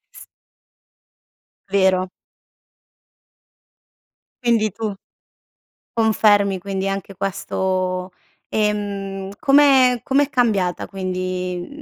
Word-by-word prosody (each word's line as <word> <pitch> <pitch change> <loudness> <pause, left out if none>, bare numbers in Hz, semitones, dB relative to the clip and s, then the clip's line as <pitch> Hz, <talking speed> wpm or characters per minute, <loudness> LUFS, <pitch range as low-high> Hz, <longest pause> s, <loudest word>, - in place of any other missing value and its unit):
S - - -12 1.4
Vero. 190 -1 +2 2.3
Quindi 225 -4 +2
tu 215 -1 -3 1.0
confermi 205 -3 +3
quindi 195 +1 -3
anche 195 0 -4
questo 185 -1 -2 0.4
ehm, 200 -2 -2
come 270 -3 +5
com'è 280 +2 +1
cambiata 205 -8 +1
quindi 185 -1 -4
195 Hz, 65 wpm, -21 LUFS, 185-220 Hz, 2.3 s, come